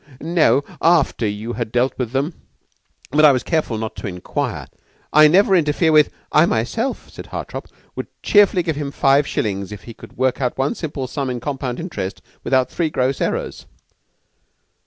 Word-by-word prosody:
"No, 155 -5 +2 0.2
after 160 -9 +3
you 105 +3 -4
had 120 -3 -4
dealt 125 +2 +1
with 125 -3 -3
them; 140 +6 -1 0.8
but 155 +3 +3
I 150 - +9
was 130 -2 0
careful 155 -9 -1
not 110 0 -5
to - - -5
inquire. 90 -2 -4 0.5
I 155 +1 +8
never 190 +4 +4
interfere 160 0 +2
with 155 -1 +5
" - - -40
"I 170 - +5
myself," 225 - -2
said - - -10
Hartopp, - - -6 0.3
"would - - -5 0.2
cheerfully 200 -3 +4
give 160 -3 -2
him 145 -2 -3
five 140 0 +3
shillings 100 -2 -2
if 100 -3 -9
he 115 - -10
could - - -15
work 130 +2 0
out 125 -2 -1
one 135 +2 0
simple 145 -5 -5
sum 135 +1 -3
in 125 -1 -3
compound 130 -1 -4
interest 160 - -5 0.2
without 130 -1 +1
three 170 -3 -1
gross 130 -2 -1
errors." - - -3
135 Hz, 180 wpm, -20 LUFS, 120-155 Hz, 0.8 s, I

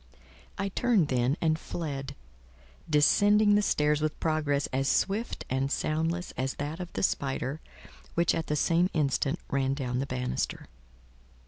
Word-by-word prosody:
I 200 0 -1
turned, 205 -6 +2
then, 130 +3 +1
and 160 -1 +2
fled; 140 -6 -5 0.7
descending 205 +8 +5
the 205 - +4
stairs 150 -6 +1
with 155 -1 -2
progress 150 -3 0
as 135 +1 +1
swift 210 +5 0
and 135 +1 -1
soundless 165 +4 -1
as 130 +1 -3
that 150 +4 -4
of 180 -1 -6
the - - -2
spider, 135 -2 -1 0.5
which 170 0 +3
at 165 - -2
the 150 - 0
same 170 +4 +2
instant 145 0 +1
ran 135 -1 +1
down 125 -3 -2
the 135 - -2
bannister. 125 -1 -3
150 Hz, 145 wpm, -29 LUFS, 135-170 Hz, 0.7 s, descending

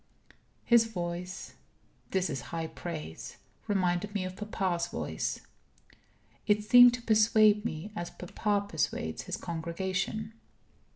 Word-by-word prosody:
His 235 -1 +6
voice 180 -2 -5 0.6
this 190 -1 +1
is 135 -5 -3
high 165 -1 -3
praise 160 - -7 0.3
reminded 190 0 0
me 190 -2 0
of 185 0 -6
papa's 185 -4 -1
voice. - - -3 1.1
It 210 0 +3
seemed 245 +2 +8
to 245 - -10
persuade 215 -1 +5
me 175 +1 -4
as 175 -3 -4
papa 200 +3 -2
persuades - - -2
his - - -4
congregation. 190 +6 -3
190 Hz, 115 wpm, -30 LUFS, 175-215 Hz, 1.1 s, seemed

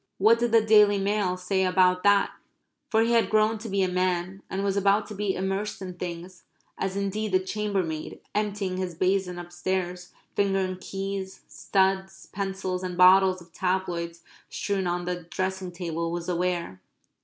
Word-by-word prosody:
What 225 +4 +5
did 240 -1 0
the 225 -1 +5
Daily 210 -2 +6
Mail 195 -2 0
say 190 +1 0
about 180 0 +3
that? 205 0 +4 0.6
For 220 -1 +3
he 230 - +1
had 230 -1 +3
grown 215 0 +2
to 225 +1 -7
be 195 0 +1
a - - +2
man, 180 +1 -1
and 195 +1 -2
was 200 -1 0
about 200 +1 +3
to - - -6
be 205 -1 -1
immersed 195 +2 -2
in 185 -1 -6
things 175 0 -7 0.3
as 190 0 -3
indeed 200 +1 -2
the 185 - +5
chambermaid, 190 -5 -3
emptying 205 -3 -1
his 185 -2 -3
basin 185 0 0
upstairs, 175 0 -3 0.2
fingering 195 -2 +1
keys, 195 0 -5
studs, 190 0 0
pencils, 190 -2 -3
and 180 -1 -4
bottles 185 0 +6
of 170 -1 -24
tabloids 175 -2 -2 0.3
strewn 195 -3 -2
on 175 0 -1
the 180 0 -3
dressing 185 +2 -3
table, 170 -1 -3
was 170 0 -4
aware. 175 - -2
190 Hz, 165 wpm, -26 LUFS, 180-200 Hz, 0.6 s, Daily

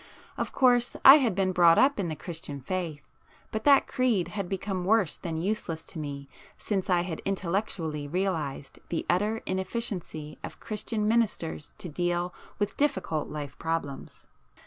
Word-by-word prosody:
Of - - -3
course 245 -1 +3
I 270 +3 +12
had 240 -10 +1
been 190 -1 +1
brought 170 -2 +6
up 275 -3 +4
in 190 - 0
the 160 - -3
Christian 160 -4 -6
faith; 160 -1 -4 0.4
but 220 0 -3
that 280 -1 +6
creed 240 -9 +1
had 200 -4 -4
become 190 -1 -2
worse 200 -3 +3
than 165 -3 -4
useless 165 -3 -2
to 170 - -8
me 140 -2 -5 0.3
since 195 -2 -2
I 180 -1 +4
had 175 -2 -4
intellectually 170 -6 -2
realized 160 -5 -2
the 170 - -2
utter 210 +5 +1
inefficiency 185 -6 -4
of - - -8
Christian 215 0 -2
ministers 210 -9 0
to - - -7
deal 175 +2 -1 0.2
with 205 0 -2
difficult 265 - 0
life 145 -2 -6
problems. 160 -4 -4
185 Hz, 155 wpm, -28 LUFS, 160-210 Hz, 0.4 s, I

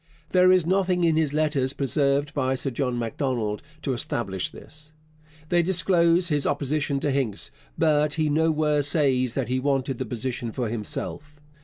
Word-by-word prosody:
There 185 0 +5
is 185 -3 +4
nothing 185 0 +1
in 165 -2 +3
his 155 -3 +1
letters 150 -3 0
preserved 140 +2 0
by 130 -2 0
Sir 130 +1 -2
John 125 -1 -2
Macdonald 115 -2 -2 0.2
to 135 - -1
establish 100 -6 -2
this. 150 0 -14 0.6
They 175 -1 +3
disclose 175 -1 +3
his 145 -2 +1
opposition 145 0 -1
to 145 - 0
Hincks, 130 -7 -1 0.3
but 150 -1 +2
he 155 -1 +1
nowhere 155 -1 +2
says 135 -4 +1
that 135 -4 -1
he 130 +1 0
wanted 135 -1 -1
the 130 - -2
position 120 0 -3
for 120 -4 -2
himself. 145 +7 -4
145 Hz, 160 wpm, -25 LUFS, 130-155 Hz, 0.6 s, There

